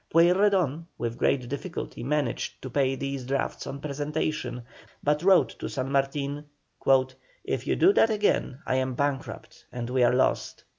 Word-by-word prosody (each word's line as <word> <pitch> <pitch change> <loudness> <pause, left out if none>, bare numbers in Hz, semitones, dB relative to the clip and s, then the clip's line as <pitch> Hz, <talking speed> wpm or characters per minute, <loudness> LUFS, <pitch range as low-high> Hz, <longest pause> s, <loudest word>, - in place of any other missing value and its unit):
Pueyrredon, 175 -2 +3
with 120 0 -4
great 130 -2 +1
difficulty 140 +1 -5
managed 140 -2 -1
to 130 - -6
pay 135 0 +1
these 135 -1 -4
drafts 135 +2 -2
on 140 - -5
presentation, 145 -3 -3 0.4
but 150 +1 +2
he 180 - -2
wrote 190 -2 +6
to - - -4
San 135 -1 -3
Martin: 140 +1 -1 1.0
"If - - -3
you - - +2
do 390 - +5
that 225 - +4
again, 205 - 0
I 130 - +1
am 130 -1 -1
bankrupt, 140 0 -4
and 120 0 -5
we 130 0 +2
are 120 - +5
lost." 125 +1 0
140 Hz, 160 wpm, -27 LUFS, 130-155 Hz, 1.0 s, wrote